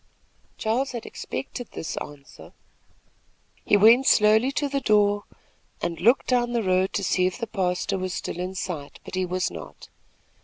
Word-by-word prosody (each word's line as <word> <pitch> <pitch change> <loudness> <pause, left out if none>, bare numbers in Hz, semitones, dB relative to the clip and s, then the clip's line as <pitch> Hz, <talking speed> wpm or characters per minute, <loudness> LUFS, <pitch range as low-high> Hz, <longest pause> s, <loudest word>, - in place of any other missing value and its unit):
Charles 245 +5 -1
had 235 - -5
expected 245 -3 -6
this 160 - -5
answer. 145 -1 -10 1.1
He 205 - +4
went 230 +6 +6
slowly 220 +5 +5
to 290 0 0
the 280 0 -1
door 205 -3 +3 0.5
and 170 -2 -3
looked 240 +5 +4
down 240 -1 +1
the 235 -2 0
road 185 0 +2
to - - -1
see 185 0 +2
if 185 - -4
the 235 - -3
pastor 190 -1 -1
was 185 0 -3
still - - -5
in 185 +1 -4
sight; 165 -6 -5
but - - -10
he 185 0 -1
was 185 +1 -1
not. - - -10
205 Hz, 165 wpm, -25 LUFS, 185-235 Hz, 1.1 s, went